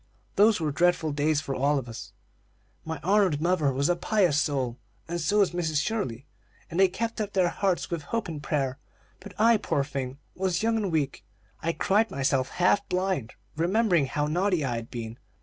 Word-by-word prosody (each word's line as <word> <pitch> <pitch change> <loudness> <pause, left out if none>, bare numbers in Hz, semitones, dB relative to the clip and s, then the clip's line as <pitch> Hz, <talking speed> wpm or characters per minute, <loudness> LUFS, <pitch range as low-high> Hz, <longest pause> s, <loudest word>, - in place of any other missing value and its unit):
Those 210 0 +5
were 155 -2 -1
dreadful 170 0 +2
days 150 +1 +1
for 140 -2 -4
all 140 +3 +2
of 130 -3 -4
us. 105 -3 -8 0.7
My 160 -2 -5
honored 190 -5 +3
mother 160 -4 +2
was 140 +2 0
a 175 - +2
pious 175 -5 +2
soul, 130 -4 -1 0.3
and 170 +1 -3
so 205 +7 +1
was 200 -3 +4
Mrs. 160 -4 0
Shirley; 150 - -2 0.5
and 170 - -2
they 190 - +7
kept 225 +4 -3
up 205 -1 -4
their 185 -2 +3
hearts 190 -1 -1
with 170 -2 -2
hope 230 +9 -3
and 155 -4 -6
prayer; 140 -3 -1 0.4
but - - -12
I, 230 +1 +6
poor 140 -8 0
thing, 135 -2 -5 0.2
was 185 0 -1
young 225 0 +2
and 200 -4 -1
weak, 145 -4 -1 0.4
and 165 - -1
I - - +1
cried 210 +7 +2
myself 135 -1 0
half 180 +3 +2
blind, 180 - -1 0.2
remembering 175 -2 +2
how 145 +2 -1
naughty 175 0 +1
I 120 -3 -1
had 115 0 -7
been. 115 -1 -6
160 Hz, 195 wpm, -27 LUFS, 140-190 Hz, 0.7 s, they